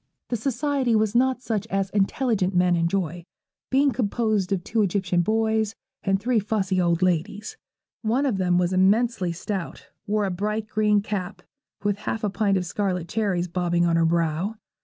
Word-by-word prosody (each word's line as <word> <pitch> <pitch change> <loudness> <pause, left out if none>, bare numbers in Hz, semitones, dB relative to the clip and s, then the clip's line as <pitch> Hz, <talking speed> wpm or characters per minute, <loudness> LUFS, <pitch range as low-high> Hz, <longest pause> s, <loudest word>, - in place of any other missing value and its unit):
The 245 - 0
society 265 +1 0
was 215 -1 +2
not 255 +1 +2
such 215 -4 -2
as 195 0 -1
intelligent 200 -1 +1
men 180 0 +4
enjoy, 170 0 -1 0.4
being 275 +1 +3
composed 215 -4 0
of 190 -3 0
two 220 +3 0
Egyptian 185 -3 +1
boys 220 +1 +1 0.3
and 195 -1 +1
three 235 +2 +1
fussy 200 -3 0
old 170 0 +1
ladies. 185 +4 -1 0.5
One 245 +6 +1
of 230 -8 0
them 180 -1 +2
was 180 +1 +1
immensely 195 0 +2
stout, 185 +1 -5 0.2
wore 210 0 +1
a 190 - -1
bright 210 +4 -2
green 210 -1 +2
cap, 200 -2 -4 0.4
with 205 -1 0
half 220 +1 -3
a 205 - 0
pint 200 -1 +1
of 180 - -2
scarlet 180 -2 -2
cherries 195 -5 0
bobbing 175 0 0
on 170 -1 +2
her 165 0 +3
brow. 170 +5 0
200 Hz, 170 wpm, -24 LUFS, 180-220 Hz, 0.5 s, men